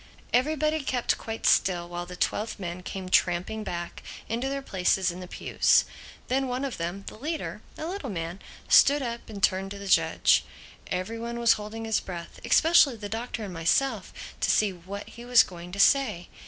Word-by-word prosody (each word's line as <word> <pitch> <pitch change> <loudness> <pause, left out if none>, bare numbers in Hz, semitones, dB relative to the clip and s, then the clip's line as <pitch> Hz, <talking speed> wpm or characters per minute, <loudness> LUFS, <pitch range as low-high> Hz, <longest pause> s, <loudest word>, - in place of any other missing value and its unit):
Everybody 305 +4 +2
kept 250 -3 0
quite 225 0 -6
still 175 -2 +3
while 175 0 -5
the 180 - -8
twelve 210 +4 -2
men 175 -1 -5
came 185 +1 -6
tramping 185 +4 +1
back 175 -3 -5 0.3
into 240 +4 -2
their 275 0 -3
places 190 -3 +1
in 175 - -9
the 180 - -8
pews. - - +2 0.4
Then 265 +1 0
one 255 +2 -2
of 270 - -4
them, 175 +4 -4
the - - -8
leader—a 310 +1 -5
little 345 -6 -4
man—stood 190 - +2
up 235 -1 -5
and 200 -3 -8
turned 190 +1 +2
to 200 - -7
the 200 - -8
judge. - - +4 0.4
Every 185 +5 -3
one 235 +1 -4
was 235 -1 +5
holding 215 +2 -6
his 220 -1 +1
breath, 170 -2 -8
especially 315 -5 +5
the 205 -2 -7
Doctor 225 0 -4
and 195 -3 -6
myself, 195 +6 +1 0.3
to 220 - 0
see 210 0 +3
what 190 +3 -8
he 235 - -11
was 245 -1 +6
going 175 -1 -10
to 200 - -6
say. 215 -8 +3
210 Hz, 180 wpm, -27 LUFS, 180-245 Hz, 0.4 s, was